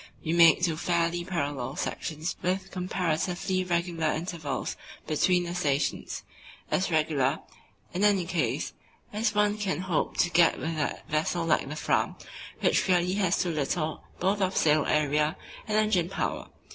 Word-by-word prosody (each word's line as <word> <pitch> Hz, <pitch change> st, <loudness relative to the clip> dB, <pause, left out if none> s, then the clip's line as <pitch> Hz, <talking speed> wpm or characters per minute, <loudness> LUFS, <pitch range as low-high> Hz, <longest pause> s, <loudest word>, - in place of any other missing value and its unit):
We 160 Hz, -, 0 dB
made 170 Hz, 0 st, +6 dB
two 165 Hz, -3 st, +1 dB
fairly 170 Hz, 0 st, 0 dB
parallel 145 Hz, -7 st, -3 dB
sections 160 Hz, +3 st, -3 dB
with 190 Hz, +2 st, -1 dB
comparatively 180 Hz, +1 st, -1 dB
regular 170 Hz, -2 st, -1 dB
intervals 160 Hz, -3 st, -3 dB, 0.3 s
between 175 Hz, +3 st, +2 dB
the 175 Hz, 0 st, -4 dB
stations; 145 Hz, -5 st, -1 dB, 0.5 s
as 185 Hz, -, +1 dB
regular, 155 Hz, -3 st, +1 dB, 0.6 s
in 185 Hz, +3 st, -1 dB
any 200 Hz, -4 st, +4 dB
case, 170 Hz, -2 st, -1 dB, 0.4 s
as 215 Hz, 0 st, 0 dB
one 210 Hz, 0 st, +2 dB
can 190 Hz, -3 st, -1 dB
hope 185 Hz, -4 st, -1 dB
to 175 Hz, -, +2 dB
get 170 Hz, -1 st, +5 dB
with 165 Hz, +1 st, -3 dB
a 150 Hz, -2 st, -2 dB
vessel 165 Hz, +2 st, 0 dB
like 155 Hz, -4 st, +1 dB
the 150 Hz, -, -5 dB
Fram, -, -, 0 dB, 0.5 s
which -, -, +2 dB
really 180 Hz, 0 st, +2 dB
has 190 Hz, -3 st, +1 dB
too 180 Hz, -, 0 dB
little 155 Hz, +1 st, -2 dB, 0.2 s
both 195 Hz, +2 st, +1 dB
of 190 Hz, 0 st, 0 dB
sail 155 Hz, -1 st, +3 dB
area 150 Hz, +1 st, +1 dB, 0.3 s
and 215 Hz, 0 st, +1 dB
engine 210 Hz, -6 st, +2 dB
power. -, -, -3 dB
170 Hz, 150 wpm, -28 LUFS, 155-185 Hz, 0.6 s, made